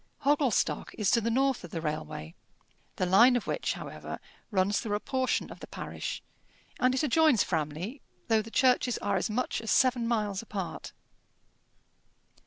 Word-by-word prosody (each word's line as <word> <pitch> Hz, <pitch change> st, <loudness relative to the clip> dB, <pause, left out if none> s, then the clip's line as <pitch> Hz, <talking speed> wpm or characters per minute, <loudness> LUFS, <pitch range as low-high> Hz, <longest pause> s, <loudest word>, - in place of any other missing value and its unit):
Hogglestock 285 Hz, -4 st, +1 dB
is 210 Hz, -3 st, +2 dB
to 235 Hz, -, +4 dB
the 230 Hz, -, 0 dB
north 265 Hz, +2 st, +1 dB
of 175 Hz, -, -8 dB
the 165 Hz, -, -4 dB
railway, 80 Hz, -, -4 dB, 0.6 s
the 185 Hz, -, 0 dB
line 230 Hz, +8 st, +6 dB
of 245 Hz, -, -1 dB
which, -, -, -1 dB
however, -, -, -7 dB, 0.3 s
runs 200 Hz, -1 st, +1 dB
through 210 Hz, -3 st, -2 dB
a -, -, -1 dB
portion 260 Hz, +1 st, -1 dB
of -, -, -10 dB
the -, -, -9 dB
parish, -, -, -5 dB, 0.6 s
and 255 Hz, +1 st, +3 dB
it 265 Hz, -, 0 dB
adjoins 305 Hz, -5 st, +4 dB
Framley, 165 Hz, -, -3 dB, 0.3 s
though 225 Hz, -1 st, +3 dB
the 220 Hz, -, -10 dB
churches 250 Hz, 0 st, +3 dB
are 200 Hz, -, -1 dB
as 190 Hz, -, -1 dB
much 240 Hz, +2 st, -1 dB
as 225 Hz, -, -6 dB
seven 250 Hz, -3 st, +3 dB
miles 210 Hz, -4 st, 0 dB
apart. 200 Hz, -5 st, -6 dB
225 Hz, 165 wpm, -29 LUFS, 190-255 Hz, 0.6 s, line